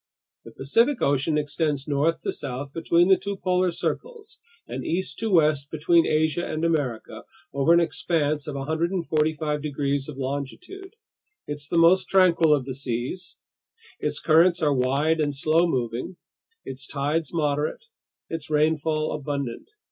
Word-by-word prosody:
The - - -10
Pacific 230 - +2
Ocean 140 +2 +1
extends 150 -1 -1
north 150 +3 +1
to - - -2
south 140 0 -6
between 170 +1 +2
the 190 -1 +5
two 200 -1 -4
polar 185 0 +1
circles 450 - -5 0.3
and - - -5
east 185 +3 -3
to 225 - -1
west 150 -5 +3
between 165 +2 +3
America 155 +1 +1
and 155 0 -2
Asia 145 -9 -2 0.3
over 140 +3 +2
an 170 - +7
expanse 155 -3 -1
of 150 - -4
145 155 0 -1
degrees 140 -1 -2
of 140 - -8
longitude. 145 - -6 0.5
It's 145 0 -6
the 170 - 0
most 170 +3 +5
tranquil 175 -4 +4
of 135 -3 -3
the 130 - -4
seas; 130 +8 -4 0.6
its - - -2
currents 170 +2 +4
are 145 -2 +3
wide 140 +5 +1
and 145 -2 0
slow 160 +5 +2
moving, 125 +4 -3 0.5
its 135 +1 -6
tides 150 +2 -2
moderate, 150 - -1 0.4
its 165 -2 -6
rainfall 155 0 +1
abundant. 140 - -4
155 Hz, 145 wpm, -25 LUFS, 140-170 Hz, 0.6 s, an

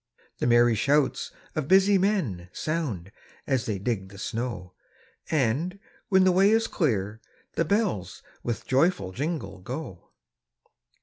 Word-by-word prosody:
The - - +1
merry 120 0 +5
shouts 140 +6 +1 0.3
of 155 -4 -2
busy 195 +2 +5
men 150 - 0
Sound, 130 - -3 0.3
as 130 -3 0
they 105 -3 -1
dig 95 -2 -2
the 100 - -13
snow; 105 -4 -4 0.6
And, 155 - 0 0.3
when 190 -2 +5
the 185 - +5
way 190 +3 +5
is 225 +1 +3
clear, 110 - -1 0.3
the 165 - +1
bells 105 - -1 0.2
With 120 -4 -3
joyful 135 - +2
jingle, 130 - -4
go. 120 - -7
130 Hz, 130 wpm, -26 LUFS, -, 0.6 s, merry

